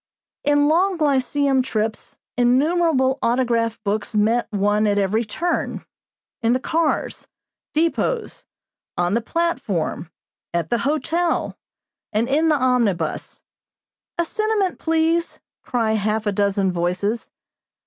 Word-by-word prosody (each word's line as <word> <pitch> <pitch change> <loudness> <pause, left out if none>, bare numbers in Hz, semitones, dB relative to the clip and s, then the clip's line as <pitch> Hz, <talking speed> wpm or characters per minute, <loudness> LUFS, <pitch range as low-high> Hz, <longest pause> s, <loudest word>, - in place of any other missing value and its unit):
In 290 0 +3
long 360 +4 +2
lyceum 280 -2 +2
trips 220 -3 -3 0.2
innumerable 265 +2 +2
autograph 235 -2 +1
books 210 +1 -2
met 225 +3 +2
one 205 +1 +2
at 205 0 +1
every 205 +3 +1
turn, 340 +11 -2 0.6
in 230 0 +3
the 255 - +1
cars, 320 +3 -1 0.5
depots, 335 +8 -1 0.5
on 175 +2 +1
the 235 - +1
platform, 225 - -2 0.5
at 170 -2 -1
the 240 - +2
hotel 325 +4 0 0.6
and 220 +2 +1
in 310 +5 +2
the 305 - +4
omnibus. 250 -8 0 0.7
"A 340 - +1
sentiment, 430 0 0
please," 325 +1 +1 0.2
cry 230 -3 0
half 215 0 0
a 205 - +1
dozen 200 -1 +1
voices. 180 +6 -1
245 Hz, 115 wpm, -22 LUFS, 210-320 Hz, 0.7 s, the